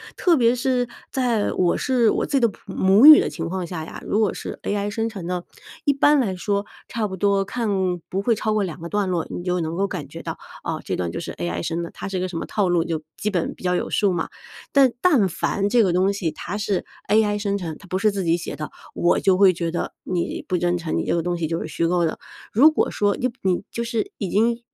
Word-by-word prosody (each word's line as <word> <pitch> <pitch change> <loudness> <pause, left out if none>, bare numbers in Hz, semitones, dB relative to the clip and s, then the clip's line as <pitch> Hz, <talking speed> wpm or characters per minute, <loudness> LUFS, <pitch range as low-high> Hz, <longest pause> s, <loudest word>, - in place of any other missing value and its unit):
特 345 -3 +3
别 235 -1 +4
是 250 0 0 0.2
在 240 -5 +1
我 175 -2 +2
是 245 -4 +2
我 - - 0
自 - - -8
己 275 - +5
的 235 - +5
普 210 - -10
母 195 +7 +5
语 310 0 +12
的 - - 0
情 165 +2 -5
况 185 0 -3
下 165 -2 -5
呀， - - -9
如 210 - 0
果 215 -3 +2
是 - - -7
AI 205 0 -1
生 225 +2 -2
成 195 -6 -7
的， 180 -1 -2 0.4
一 285 - +4
般 290 +1 +4
来 200 -8 0
说 200 +2 -1 0.2
差 225 -2 -2
不 190 - -6
多 200 +1 +2
看 230 +3 -3 0.4
不 195 - -1
会 230 +3 +2
超 215 0 -1
过 210 -1 +1
2 180 -3 -5
个 170 - -6
段 205 -1 0
落， 175 -3 0
你 175 - -5
就 180 0 0
能 165 0 -2
够 195 +2 +1
感 - - -5
觉 - - -9
到 - - -5 0.3
啊， - - -3
这 - - -2
段 85 -2 -2
就 - - -4
是 - - -5
AI 85 0 -3
生 165 +1 -2
的， 170 - -6
它 - - -7
是 195 -1 -3
一 - - -1
个 185 - -1
什 180 -2 -5
么 - - -3
套 200 -4 0
路 175 -2 +3
就 165 -1 -3 0.2
基 210 - -1
本 175 -4 -1
比 - - -16
较 180 0 +1
有 - - -2
数 200 -3 +2
嘛。 165 -2 -2 0.4
但 275 -3 +5
但 280 - +4
凡 190 +3 -1
这 240 +2 +4
个 190 - +2
东 185 +2 +3
西， 195 -5 -2
它 180 +5 -5
是 200 -2 -1 0.3
AI 210 -1 +3
生 200 -1 -1
成， 170 -5 -5
它 195 - -15
不 185 - -1
是 210 +2 +2
自 200 -1 -2
己 165 -1 +3
写 170 - -6
的， 155 - -6 0.2
我 175 - +2
就 190 -2 +3
会 190 -1 +6
觉 170 -1 -2
得 170 - -3
你 175 -2 -2
不 180 - 0
真 175 0 +1
诚， 165 -2 -3
你 - - -1
这 - - +1
个 170 - +1
东 175 0 -1
西 165 -2 -1
就 165 +1 -2
是 - - -4
虚 165 +2 -1
构 175 0 +2
的。 160 - -3 0.3
如 285 +9 +6
果 310 - 0
说 205 -1 +1
你 255 - -1
你 185 -2 0
就 235 - -3
是 230 -2 -2
已 195 - -3
经 230 +4 +2
195 Hz, 295 characters per minute, -23 LUFS, 175-220 Hz, 0.4 s, 语